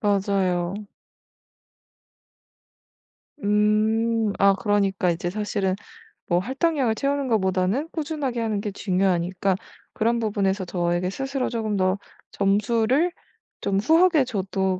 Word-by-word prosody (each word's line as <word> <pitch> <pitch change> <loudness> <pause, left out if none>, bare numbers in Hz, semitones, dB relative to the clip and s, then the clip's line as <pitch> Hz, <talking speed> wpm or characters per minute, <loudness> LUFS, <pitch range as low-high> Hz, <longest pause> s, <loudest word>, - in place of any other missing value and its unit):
맞아요. 195 -1 0 2.6
음. 215 +1 +2
아 195 0 +5
그러니까 195 -2 +1
이제 175 +1 -2
사실은 200 -2 -1 0.5
뭐 175 -1 +2
할당량을 265 - 0
채우는 280 +2 -1
거보다는 195 - +1
꾸준하게 290 -6 -3
하는 215 -3 -1
게 205 - -3
중요하니까 185 -1 0 0.4
그런 235 +1 +1
부분에서 200 -3 0
저에게 175 0 -1
스스로 270 +4 -2
쪼금 220 -3 -2
더 185 0 +1 0.3
점수를 225 - +2 0.5
좀 195 0 0
후하게 320 - +4
줘도 190 -4 -1
205 Hz, 250 characters per minute, -24 LUFS, 190-235 Hz, 2.6 s, 아